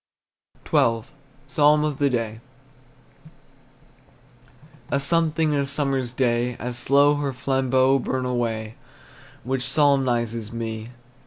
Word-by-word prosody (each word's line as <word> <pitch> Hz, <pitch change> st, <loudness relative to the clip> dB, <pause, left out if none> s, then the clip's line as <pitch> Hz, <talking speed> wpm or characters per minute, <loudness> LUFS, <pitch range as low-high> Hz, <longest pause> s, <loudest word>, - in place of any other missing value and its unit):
XII. 115 Hz, -1 st, +2 dB, 0.4 s
PSALM 150 Hz, +1 st, +3 dB
OF 150 Hz, -2 st, -2 dB
THE 140 Hz, -1 st, +3 dB
DAY. 115 Hz, -3 st, -2 dB, 2.5 s
A 140 Hz, -, +1 dB
something 160 Hz, +1 st, +1 dB
in 145 Hz, -, +1 dB
a 140 Hz, -, -1 dB
summer's 135 Hz, -3 st, 0 dB
day, 120 Hz, -1 st, 0 dB
As 125 Hz, 0 st, -5 dB
slow 140 Hz, +4 st, +4 dB
her 140 Hz, -2 st, -2 dB
flambeaux 130 Hz, 0 st, +2 dB
burn 130 Hz, 0 st, -2 dB
away, 115 Hz, -3 st, -3 dB, 0.7 s
Which 130 Hz, 0 st, -2 dB
solemnizes 120 Hz, -7 st, +1 dB
me. 115 Hz, -1 st, -5 dB
130 Hz, 105 wpm, -23 LUFS, 120-140 Hz, 2.5 s, slow